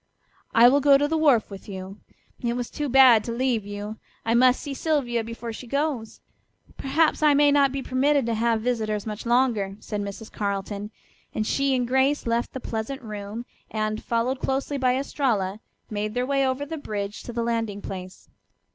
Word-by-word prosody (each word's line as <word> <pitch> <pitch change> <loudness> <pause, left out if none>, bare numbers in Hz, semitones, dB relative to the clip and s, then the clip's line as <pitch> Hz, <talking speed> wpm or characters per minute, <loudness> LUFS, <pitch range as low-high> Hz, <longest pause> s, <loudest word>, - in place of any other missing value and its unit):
"I 235 +1 +8
will 275 +3 +5
go 280 0 +6
to 290 +1 +1
the 320 - -1
wharf 285 -10 +3
with 195 +1 -10
you. 190 +1 -7 0.4
It 235 -1 -1
was 245 -1 -4
too 295 -1 -3
bad 255 -4 +7
to 235 - -3
leave 235 -3 0
you. 205 +2 -6 0.3
I 225 - +2
must 250 +1 +5
see 285 - -5
Sylvia 265 -6 0
before 230 0 -6
she 245 - -9
goes. 280 -4 -2 0.5
Perhaps 310 +4 +1
I 300 -2 +5
may 290 0 +5
not 280 -2 +4
be 270 0 -4
permitted 275 +1 +2
to 230 - 0
have 225 0 +1
visitors 215 -4 -1
much 215 +1 -5
longer," 235 -6 +2
said 210 -1 -4
Mrs. 200 +2 -7
Carleton, 200 0 -3 0.5
and 215 - 0
she 275 +3 +1
and 250 -1 0
Grace 265 +3 +2
left 235 0 -1
the 265 - -4
pleasant 245 +4 -4
room 210 +1 -6 0.2
and, 215 0 -2
followed 240 +3 0
closely 275 +2 -1
by 255 -1 +2
Estralla, 225 -8 -1 0.3
made 215 +1 -3
their 250 0 +1
way 275 0 +1
over 260 +2 -1
the 320 +1 -6
bridge 205 -5 -4
to - - -7
the 235 0 -2
landing 225 -3 -1
place. 185 -2 -8
235 Hz, 190 wpm, -25 LUFS, 215-270 Hz, 0.5 s, I